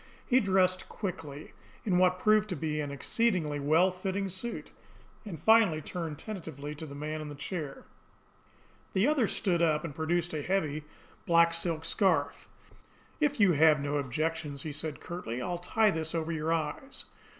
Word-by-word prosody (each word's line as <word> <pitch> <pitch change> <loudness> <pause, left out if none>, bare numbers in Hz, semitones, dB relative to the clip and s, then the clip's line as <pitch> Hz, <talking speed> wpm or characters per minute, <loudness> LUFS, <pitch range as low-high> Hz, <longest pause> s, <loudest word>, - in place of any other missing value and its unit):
He 255 0 +4
dressed 185 -4 +2
quickly, 160 -7 -6 0.3
in 180 -4 +2
what 185 0 +4
proved 215 +2 +3
to 180 - -2
be 155 -1 -2
an 145 - -3
exceedingly 150 - 0
well 160 +6 +4
fitting 190 +2 -3
suit; 190 +6 -4 0.6
and 170 -7 -6
finally 220 -3 +5
turned 160 -1 -5
tentatively 160 -7 -6
to 155 +1 -7
the 140 - -9
man 155 +2 -4
in 150 - -6
the 145 - -7
chair. 145 -1 -5 1.1
The 190 +3 +3
other 285 -6 +3
stood 180 -5 0
up, 155 -2 +2
and 155 - -5
produced 170 +3 -1
a 155 - -2
heavy 155 -3 -1 0.4
black 170 0 +5
silk 165 -1 -1
scarf. 165 -7 +1 0.7
"If 295 -4 +1
you 200 -4 +6
have 155 -1 +5
no 145 +1 -1
objections," 145 +1 -2
he 155 - -4
said 150 +1 -3
curtly, 170 -9 -5
"I'll 175 +6 -3
tie 215 +4 +2
this 160 -1 -3
over 165 0 -1
your 160 0 -1
eyes." 165 - -3
165 Hz, 165 wpm, -30 LUFS, 150-190 Hz, 1.1 s, you